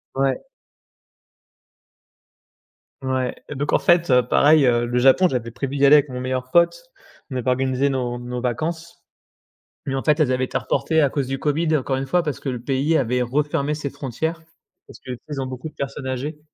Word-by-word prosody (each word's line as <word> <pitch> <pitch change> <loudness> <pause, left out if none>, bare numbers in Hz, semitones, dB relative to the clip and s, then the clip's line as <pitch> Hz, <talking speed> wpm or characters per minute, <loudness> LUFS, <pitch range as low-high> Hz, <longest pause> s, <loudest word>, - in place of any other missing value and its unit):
Ouais. 135 -1 0 2.6
Ouais 130 -1 -1
et 145 - -5
donc, 145 +2 -2
en - - +4
fait, 175 -2 +3
heu, 125 -1 +4
pareil, 150 -1 +5
heu, 120 -1 +2
le 120 +1 -2
Japon, 135 +9 +5
j'avais 120 -6 -3
prévu 135 +3 -4
d'y 140 0 +3
aller 145 - +8
avec 145 0 +2
mon 125 -1 -5
meilleur 130 0 -3
pote, 175 - +3 0.5
on - - -4
avait 125 0 -1
organisé 130 +2 +1
nos 125 -2 -2
nos 125 0 -5
vacances. 160 +7 -4 0.8
Mais, 135 - -3
en 135 - -1
fait, 150 0 +2
elles 145 -5 +3
avaient 130 0 +1
été - - -2
reportées 160 -1 0
à 140 -3 +2
cause 140 -3 -2
du 135 +1 -2
Covid, 155 +3 +1
encore 135 -1 -2
une 135 +1 -3
fois, 175 +6 +2
parce 150 -5 -3
que 135 - -4
le 125 - -3
pays 135 +6 +1
avait 125 -2 0
refermé 145 +3 0
ses 150 -2 -5
frontières, 160 +5 -4 0.5
parce - - -14
que, 130 - -8
tu 125 - -5
sais, - - -34
ils 135 - -3
ont - - -2
beaucoup 130 +4 -6
de 150 - -24
personnes 140 0 -5
âgées 140 +4 -4
135 Hz, 205 wpm, -22 LUFS, 125-150 Hz, 2.6 s, aller